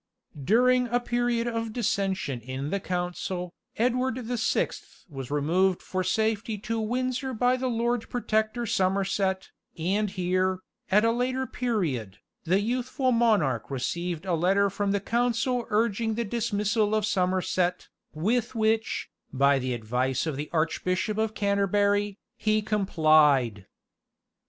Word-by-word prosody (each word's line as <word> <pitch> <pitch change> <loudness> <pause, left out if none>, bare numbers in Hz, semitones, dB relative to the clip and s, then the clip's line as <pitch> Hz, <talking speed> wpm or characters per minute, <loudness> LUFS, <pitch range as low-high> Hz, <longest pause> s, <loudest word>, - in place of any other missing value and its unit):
During 250 - +4
a 240 +1 +1
period 240 -1 0
of 230 -2 -3
dissension 195 - -1
in 130 +5 -5
the 200 - 0
council, 180 0 -3 0.2
Edward 250 +1 +1
the 245 +2 -2
Sixth 220 - -2
was 135 -6 -7
removed 170 +6 +2
for 185 0 -2
safety 220 +2 0
to 225 +3 -3
Windsor 255 +3 -2
by 245 +3 +3
the 255 0 -2
Lord 235 -1 -1
Protector 220 0 0
Somerset, 190 -1 0 0.3
and 195 +6 0
here, 185 0 0 0.3
at 210 +3 +4
a 230 - +4
later 255 +2 -1
period, 165 - -2 0.3
the 185 +4 +2
youthful 255 +3 0
monarch 210 - +2
received 170 +6 -3
a 185 - 0
letter 195 +4 +2
from 200 +1 -1
the 200 - +1
council 240 +2 0
urging 220 +1 +1
the 235 +1 -1
dismissal 215 -1 0
of 215 -2 +1
Somerset, 185 -2 0 0.2
with 230 +10 -1
which, 220 0 0 0.2
by 140 +1 +3
the 130 -1 -2
advice 125 +4 -1
of 155 -3 -2
the 145 +2 -5
Arch 160 -1 0
bishop 185 +4 -1
of 220 0 -1
Canterbury, 200 0 +1 0.2
he 215 0 +1
complied. 155 - +3
205 Hz, 135 wpm, -27 LUFS, 175-230 Hz, 0.3 s, During